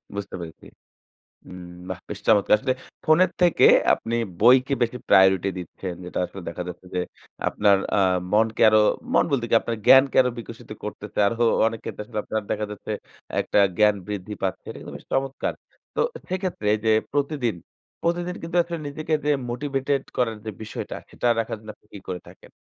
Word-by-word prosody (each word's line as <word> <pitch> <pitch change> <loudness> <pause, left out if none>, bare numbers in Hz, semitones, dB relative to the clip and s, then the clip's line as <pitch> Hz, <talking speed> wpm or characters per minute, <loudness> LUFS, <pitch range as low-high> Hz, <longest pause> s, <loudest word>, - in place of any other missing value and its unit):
বুঝতে 100 -1 -5
পেরেছি। 80 -2 -10 0.8
হুম, 90 0 -10 0.2
বাহ - - -4
বেশ - - -6
চমৎকার! 105 -2 +5
আসলে 130 +4 0 0.3
ফোনের 170 +4 +5
থেকে 175 -2 +5 0.3
আপনি 115 +1 -5 0.3
বইকে 130 +4 +5
বেশি 120 +1 0
প্রায়োরিটি 95 0 +5
দিচ্ছেন। 90 +1 -6
যেটা 90 - -5
আসলে 95 - -10
দেখা 85 +1 -5
যাচ্ছে 90 +1 -9
যে 90 - +1 0.5
আপনার 100 -1 +3 0.2
আ - - +3 0.3
মনকে 110 +1 +2
আরও 110 0 +5 0.3
মন - - +4
বলতে 135 -4 +1
কি - - +4
আপনার 115 - -3
জ্ঞানকে 135 0 +7
আরো 125 - 0
বিকশিত 115 - -10
করতেছে। - - -7
আরো 115 - -3 0.3
অনেক 115 -1 -2
ক্ষেত্রে - - -5
আসলে 110 0 -6
আপনার 110 0 -2
দেখা 105 0 -1
যাচ্ছে 105 - -6 0.5
একটা - - 0 0.2
জ্ঞান 105 -1 +5
বৃদ্ধি 105 0 -5
পাচ্ছে। 95 -2 -2
এটা - - -8
কিন্তু - - -9
বেশ - - -14
চমৎকার। 135 0 -1 0.4
তো - - 0 0.3
সেক্ষেত্রে 185 - -2 0.2
যে 110 - +3 0.2
প্রতিদিন, 140 -5 0 0.5
প্রতিদিন 175 +1 -1
কিন্তু 165 +2 -4
আসলে 170 0 -5
নিজেকে 155 +2 -2
যে 150 - +2 0.2
মোটিভেটেড 135 +2 -1
করার 115 -3 0
যে 110 - -3
বিষয়টা 105 - -6 0.2
সেটা - - -3
রাখার 115 0 -2
জন্য 110 0 -10
আপনি - - -34
কী - - -8
করে 90 -1 -4
থাকেন? - - -16
115 Hz, 175 wpm, -24 LUFS, 105-140 Hz, 0.8 s, জ্ঞানকে